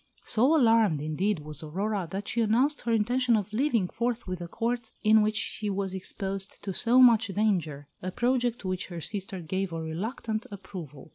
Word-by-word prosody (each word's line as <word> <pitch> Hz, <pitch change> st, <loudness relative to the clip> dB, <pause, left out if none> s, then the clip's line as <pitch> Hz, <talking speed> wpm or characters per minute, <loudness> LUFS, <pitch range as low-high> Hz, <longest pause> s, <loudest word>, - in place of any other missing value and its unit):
So 260 Hz, +9 st, +3 dB
alarmed, 225 Hz, -, +4 dB
indeed, 155 Hz, +5 st, -1 dB
was 150 Hz, -1 st, -4 dB
Aurora, 190 Hz, +4 st, -2 dB
that 195 Hz, +3 st, -5 dB
she 235 Hz, -, 0 dB
announced 250 Hz, +7 st, +2 dB
her 235 Hz, -, -2 dB
intention 235 Hz, +2 st, +2 dB
of 210 Hz, 0 st, -4 dB
leaving 230 Hz, -5 st, +2 dB
forthwith 230 Hz, -5 st, -3 dB
a 175 Hz, -, -5 dB
Court 230 Hz, +3 st, -2 dB
in 215 Hz, 0 st, +6 dB
which 215 Hz, 0 st, +1 dB
she 210 Hz, 0 st, -2 dB
was 195 Hz, -1 st, -2 dB
exposed 195 Hz, +1 st, -5 dB
to 195 Hz, -, -3 dB
so 240 Hz, +6 st, +2 dB
much 230 Hz, -3 st, +7 dB
danger 180 Hz, -9 st, -1 dB
a 185 Hz, -, -3 dB
project 240 Hz, +3 st, 0 dB
to 190 Hz, -, -5 dB
which 185 Hz, -1 st, -2 dB
her 175 Hz, -2 st, -6 dB
sister 195 Hz, +1 st, -4 dB
gave 185 Hz, +3 st, -2 dB
a 165 Hz, -, -4 dB
reluctant 215 Hz, +7 st, -4 dB
approval. 180 Hz, -8 st, -9 dB
205 Hz, 185 wpm, -28 LUFS, 185-230 Hz, -, much